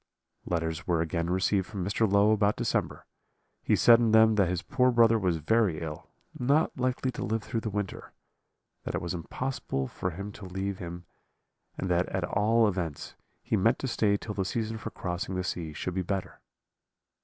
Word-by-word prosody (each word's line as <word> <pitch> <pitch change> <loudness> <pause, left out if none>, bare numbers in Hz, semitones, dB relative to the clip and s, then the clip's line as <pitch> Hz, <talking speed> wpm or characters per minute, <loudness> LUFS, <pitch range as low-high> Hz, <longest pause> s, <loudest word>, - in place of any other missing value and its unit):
"Letters 80 -2 -2
were 85 -2 +2
again 85 +1 -1
received 95 +1 +1
from 100 -4 -4
Mr. 100 +1 +1
Low 100 +1 +5
about 105 -1 +3
December; - - -2 0.6
he - - +2
said 120 -1 +7
in 115 -2 +2
them 110 0 +7
that 100 -4 +3
his 90 -2 -2
poor 125 0 +2
brother 115 -2 +5
was 90 -4 +1
very 95 0 +2
ill, 80 -2 -7 0.3
not 140 +6 +2
likely 130 0 -1
to - - -5
live 110 +1 -1
through 115 - -2
the 110 - -4
winter; 100 -2 -4 0.7
that - - -3
it - - +1
was 85 -1 -3
impossible 85 - -3
for 90 - -3
him 100 +4 -6
to 105 -1 -10
leave 95 +1 -4
him, 85 0 -7 0.7
and 95 - -3
that 90 +1 +2
at 95 -2 -2
all 110 +5 +3
events 90 -7 -3 0.3
he - - 0
meant - - +3
to - - -3
stay 100 -2 +2
till 105 - -6
the 100 - -1
season 110 +2 -3
for 110 - -5
crossing 90 +1 -4
the 90 - -1
sea 85 -3 -4
should 90 +4 -4
be 95 - -1
better. 95 +1 -4
100 Hz, 190 wpm, -28 LUFS, 90-110 Hz, 0.7 s, said